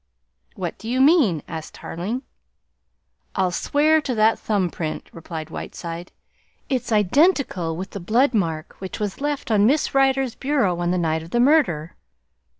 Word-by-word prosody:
"What -, -, -5 dB
do 225 Hz, -, -7 dB
you 255 Hz, +2 st, 0 dB
mean?" 265 Hz, -, +4 dB
asked 160 Hz, -2 st, -7 dB
Tarling. 210 Hz, +10 st, -4 dB, 1.1 s
"I'll 185 Hz, -2 st, +1 dB
swear 305 Hz, -, +2 dB
to 260 Hz, -4 st, -2 dB
that 220 Hz, +1 st, +3 dB
thumb 195 Hz, -5 st, 0 dB
print," 155 Hz, -2 st, -4 dB
replied 160 Hz, -1 st, -7 dB
Whiteside. 170 Hz, +1 st, -7 dB, 0.6 s
"It's 255 Hz, -4 st, -1 dB
identical 210 Hz, -, +2 dB
with 190 Hz, +2 st, -6 dB
the 200 Hz, -, -6 dB
blood 240 Hz, +9 st, +2 dB
mark 165 Hz, -7 st, -1 dB
which 190 Hz, -1 st, -6 dB
was 210 Hz, +3 st, -3 dB
left 290 Hz, -4 st, -2 dB
on 210 Hz, -1 st, +4 dB
Miss 295 Hz, +5 st, +1 dB
Rider's 270 Hz, -2 st, +2 dB
bureau 260 Hz, -11 st, 0 dB
on 175 Hz, 0 st, 0 dB
the 180 Hz, -, +1 dB
night 160 Hz, -2 st, 0 dB
of 165 Hz, -, -10 dB
the 240 Hz, -, 0 dB
murder!" 240 Hz, -, +3 dB
210 Hz, 155 wpm, -22 LUFS, 170-270 Hz, 1.1 s, mean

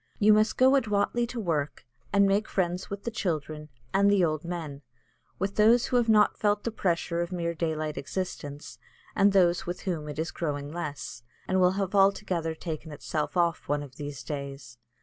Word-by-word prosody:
You 215 Hz, +1 st, +6 dB
must 215 Hz, +1 st, +2 dB
go 260 Hz, +1 st, +6 dB
adroitly 235 Hz, -1 st, +1 dB
to 245 Hz, 0 st, -5 dB
work, 155 Hz, -9 st, -2 dB, 0.3 s
and 200 Hz, 0 st, +5 dB
make 200 Hz, +2 st, +2 dB
friends 180 Hz, -1 st, -1 dB
with 200 Hz, 0 st, -6 dB
the 235 Hz, -, -3 dB
children, 155 Hz, -7 st, -3 dB, 0.2 s
and 200 Hz, +1 st, +4 dB
the 200 Hz, -3 st, +4 dB
old 155 Hz, 0 st, -2 dB
men, 165 Hz, -5 st, -5 dB, 0.6 s
with 195 Hz, +2 st, -3 dB
those 230 Hz, +3 st, +5 dB
who 250 Hz, -, +1 dB
have 235 Hz, -2 st, +2 dB
not 210 Hz, -1 st, +4 dB
felt 205 Hz, -1 st, +1 dB
the 230 Hz, -, -2 dB
pressure 170 Hz, -4 st, -1 dB
of 175 Hz, +1 st, -3 dB
mere 170 Hz, -2 st, -2 dB
daylight 155 Hz, -2 st, -2 dB
existence, 145 Hz, -3 st, -6 dB, 0.4 s
and 200 Hz, +1 st, +5 dB
those 180 Hz, -3 st, +3 dB
with 175 Hz, +1 st, -4 dB
whom 160 Hz, -5 st, -3 dB
it 150 Hz, -, -6 dB
is 160 Hz, +2 st, -2 dB
growing 145 Hz, -3 st, -3 dB
less, 145 Hz, -7 st, -5 dB, 0.3 s
and 185 Hz, 0 st, +2 dB
will 180 Hz, 0 st, +4 dB
have 195 Hz, -1 st, -2 dB
altogether 195 Hz, -5 st, +2 dB
taken 160 Hz, -1 st, -6 dB
itself 150 Hz, +3 st, -3 dB
off 170 Hz, -1 st, +1 dB
one 145 Hz, 0 st, 0 dB
of 135 Hz, -3 st, -13 dB
these 145 Hz, -4 st, -6 dB
days. 140 Hz, -2 st, -7 dB
175 Hz, 190 wpm, -28 LUFS, 150-200 Hz, 0.6 s, You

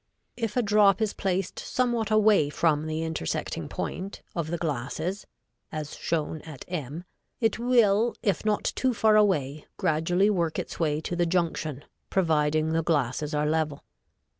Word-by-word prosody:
If 225 Hz, -1 st, -3 dB
a 245 Hz, -, +3 dB
drop 205 Hz, -1 st, +4 dB
is 215 Hz, -2 st, 0 dB
placed 190 Hz, -1 st, -2 dB
somewhat 240 Hz, -3 st, 0 dB
away 215 Hz, -8 st, +4 dB
from 155 Hz, 0 st, +1 dB
the 155 Hz, +1 st, -2 dB
intersecting 160 Hz, -, -3 dB
point, 190 Hz, +3 st, -5 dB
of 170 Hz, -3 st, -1 dB
the 170 Hz, -, -1 dB
glasses, 160 Hz, +5 st, -3 dB, 0.4 s
as 155 Hz, -2 st, -5 dB
shown 155 Hz, -1 st, -2 dB
at 155 Hz, -5 st, -10 dB
m 160 Hz, -2 st, -5 dB, 0.4 s
it 225 Hz, -1 st, +1 dB
will, 235 Hz, -2 st, +3 dB
if 200 Hz, -7 st, +1 dB
not 215 Hz, -1 st, +1 dB
too 255 Hz, -2 st, 0 dB
far 220 Hz, 0 st, +4 dB
away, 155 Hz, -9 st, +2 dB
gradually 175 Hz, +6 st, +2 dB
work 170 Hz, -5 st, 0 dB
its -, -, -5 dB
way 155 Hz, -2 st, +1 dB
to 175 Hz, -, -3 dB
the 175 Hz, -1 st, +1 dB
junction, 160 Hz, -5 st, -1 dB, 0.2 s
providing 155 Hz, -3 st, +2 dB
the 165 Hz, -, +2 dB
glasses 150 Hz, -2 st, 0 dB
are 150 Hz, 0 st, +1 dB
level. 150 Hz, -2 st, -1 dB
170 Hz, 155 wpm, -27 LUFS, 155-205 Hz, 0.4 s, drop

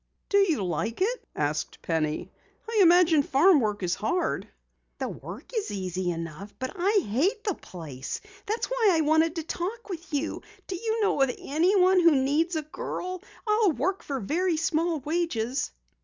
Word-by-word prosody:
"Do 405 Hz, -, +4 dB
you 330 Hz, -, +2 dB
like 180 Hz, +7 st, -2 dB
it?" 470 Hz, +7 st, -1 dB
asked 150 Hz, +1 st, -2 dB
Penny. 155 Hz, -2 st, -1 dB, 0.4 s
"I 450 Hz, -1 st, 0 dB
imagine 345 Hz, -3 st, +6 dB
farm 295 Hz, +5 st, +5 dB
work 210 Hz, -4 st, -1 dB
is 175 Hz, -1 st, +1 dB
hard." 220 Hz, -, -1 dB, 0.5 s
"The -, -, -2 dB
work -, -, -9 dB
is 440 Hz, -, -1 dB
easy 185 Hz, -2 st, -2 dB
enough. 165 Hz, +3 st, -5 dB
But 260 Hz, 0 st, -4 dB
I 390 Hz, +2 st, +2 dB
hate 345 Hz, -, +1 dB
the 405 Hz, -, 0 dB
place! 150 Hz, -, -7 dB, 0.3 s
That's 435 Hz, +3 st, 0 dB
why -, -, +2 dB
I 320 Hz, -, +3 dB
wanted 315 Hz, +2 st, +3 dB
to 330 Hz, -, -3 dB
talk 390 Hz, +8 st, -4 dB
with 345 Hz, -2 st, -7 dB
you. 295 Hz, +2 st, -2 dB, 0.2 s
Do 380 Hz, -, -4 dB
you 445 Hz, +4 st, -1 dB
know 405 Hz, -, +2 dB
of 270 Hz, -, +4 dB
anyone 365 Hz, +5 st, +3 dB
who 335 Hz, -3 st, +6 dB
needs 295 Hz, +6 st, +1 dB
a 310 Hz, -, -1 dB
girl? 365 Hz, +4 st, -5 dB, 0.2 s
I'll 425 Hz, -4 st, +3 dB
work 360 Hz, +10 st, -1 dB
for 275 Hz, -2 st, -3 dB
very 335 Hz, -, 0 dB
small 325 Hz, 0 st, 0 dB
wages." 285 Hz, -5 st, -1 dB
320 Hz, 170 wpm, -27 LUFS, 220-370 Hz, 0.5 s, imagine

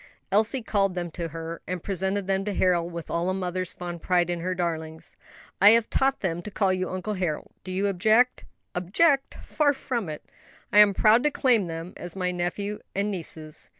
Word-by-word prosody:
Elsie 220 Hz, +5 st, +2 dB
called 195 Hz, -4 st, +1 dB
them 175 Hz, -2 st, -3 dB
to 170 Hz, +1 st, -4 dB
her, 165 Hz, +1 st, -6 dB
and 180 Hz, -2 st, -4 dB
presented 190 Hz, +1 st, -1 dB
them 195 Hz, 0 st, 0 dB
to 205 Hz, -1 st, -3 dB
Harold 175 Hz, -2 st, +2 dB
with 170 Hz, -1 st, -7 dB
all 170 Hz, +2 st, 0 dB
a 185 Hz, -, 0 dB
mother's 185 Hz, -1 st, -3 dB
fond 175 Hz, -1 st, -6 dB
pride 175 Hz, -1 st, +2 dB
in 175 Hz, -, -2 dB
her 185 Hz, +2 st, -2 dB
darlings. 160 Hz, -2 st, -4 dB, 0.5 s
"I 200 Hz, -, +9 dB
have 230 Hz, -, -3 dB
taught 270 Hz, 0 st, +1 dB
them 175 Hz, -3 st, -1 dB
to 210 Hz, -, -7 dB
call 195 Hz, -2 st, +1 dB
you 185 Hz, 0 st, -2 dB
Uncle 185 Hz, +3 st, -3 dB
Harold. 180 Hz, -6 st, -3 dB
Do 185 Hz, -, -7 dB
you 190 Hz, +2 st, 0 dB
object?" 215 Hz, +6 st, +3 dB, 0.3 s
"Object? 270 Hz, -, +2 dB
far 290 Hz, -2 st, +2 dB
from 240 Hz, -, -3 dB
it; 150 Hz, -, -7 dB, 0.5 s
I 205 Hz, -, +7 dB
am 205 Hz, -2 st, +7 dB
proud 220 Hz, +2 st, +5 dB
to 300 Hz, -, +3 dB
claim 240 Hz, -9 st, +2 dB
them 165 Hz, +2 st, -6 dB
as 175 Hz, 0 st, -7 dB
my 180 Hz, -1 st, -1 dB
nephew 180 Hz, +4 st, -3 dB, 0.2 s
and 200 Hz, +2 st, 0 dB
nieces." 160 Hz, -4 st, -7 dB
185 Hz, 200 wpm, -26 LUFS, 175-210 Hz, 0.5 s, I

